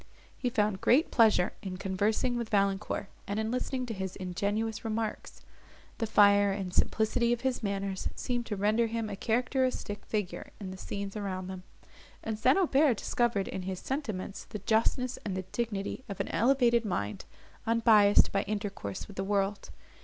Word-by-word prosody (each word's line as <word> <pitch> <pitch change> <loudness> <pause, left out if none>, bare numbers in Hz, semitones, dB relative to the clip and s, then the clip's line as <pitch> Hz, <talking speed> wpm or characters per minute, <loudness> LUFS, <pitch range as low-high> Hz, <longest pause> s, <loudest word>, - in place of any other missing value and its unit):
He 250 - -1
found 210 -4 0
great 280 +7 +4
pleasure 220 -7 +4
in 185 -2 -5
conversing 205 +6 0
with 235 -2 -3
Valancourt, 200 0 0 0.2
and 205 +2 -2
in 220 +1 -1
listening 255 +1 -2
to 235 - -4
his 190 -2 -4
ingenuous 205 +5 -2
remarks. 220 -1 -3 0.6
The 225 - 0
fire 200 -1 +5
and 195 -2 -4
simplicity 235 +4 +2
of 240 - -3
his 260 -1 -1
manners 195 -2 -2
seemed 245 -2 -2
to 210 - -2
render 215 +4 +2
him 225 -1 -3
a - - -3
characteristic 250 -1 -1
figure 210 -4 -3
in 190 -3 -6
the - - -7
scenes 200 +1 -5
around 190 -3 -4
them; 190 -1 -6 0.6
and 220 -1 -3
St. 260 - +4
Aubert 295 - +4
discovered 235 -5 0
in 190 - -4
his 185 0 -4
sentiments 215 -9 -4
the - - -6
justness 230 +5 +1
and 190 -3 -3
the 185 - -3
dignity 225 +1 -3
of 200 - -6
an - - -2
elevated 240 -1 +3
mind, 105 - -3 0.4
unbiased 220 -3 +5
by 195 - +1
intercourse 200 - -4
with 205 - -13
the 190 - -1
world. 200 0 -1
210 Hz, 170 wpm, -30 LUFS, 195-235 Hz, 0.6 s, fire